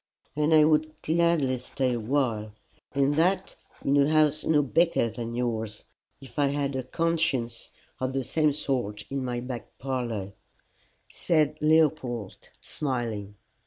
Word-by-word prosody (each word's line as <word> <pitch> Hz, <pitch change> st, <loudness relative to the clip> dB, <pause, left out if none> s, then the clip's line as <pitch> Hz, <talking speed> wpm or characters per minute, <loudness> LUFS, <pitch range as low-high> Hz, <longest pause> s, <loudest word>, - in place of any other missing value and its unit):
"And 150 Hz, +1 st, +1 dB
I 155 Hz, -1 st, +7 dB
would 155 Hz, 0 st, +2 dB
gladly 160 Hz, -6 st, +2 dB
stay 130 Hz, 0 st, -1 dB
a 120 Hz, -, -1 dB
while, 110 Hz, -3 st, -1 dB, 0.4 s
and 140 Hz, +1 st, +2 dB
that 180 Hz, +4 st, +1 dB, 0.3 s
in 140 Hz, -, +3 dB
a 140 Hz, +1 st, +4 dB
house 155 Hz, -1 st, +3 dB
no 150 Hz, -2 st, +3 dB
bigger 165 Hz, -4 st, +2 dB
than 115 Hz, 0 st, -5 dB
yours, 110 Hz, -3 st, -2 dB, 0.4 s
if 135 Hz, +2 st, -9 dB
I 145 Hz, -, +4 dB
had 140 Hz, -1 st, -1 dB
a 130 Hz, -, -1 dB
conscience 130 Hz, -5 st, -1 dB, 0.3 s
of 130 Hz, 0 st, -1 dB
the 135 Hz, -1 st, -1 dB
same 155 Hz, +4 st, +2 dB
sort 120 Hz, -8 st, -2 dB
in 135 Hz, -1 st, -2 dB
my 120 Hz, -1 st, -2 dB
back 125 Hz, -2 st, -7 dB
parlour," 120 Hz, -7 st, -3 dB, 0.8 s
said 155 Hz, -2 st, +1 dB
Leopold 150 Hz, -9 st, +1 dB
smiling. 115 Hz, -7 st, -3 dB
135 Hz, 140 wpm, -27 LUFS, 120-155 Hz, 0.8 s, I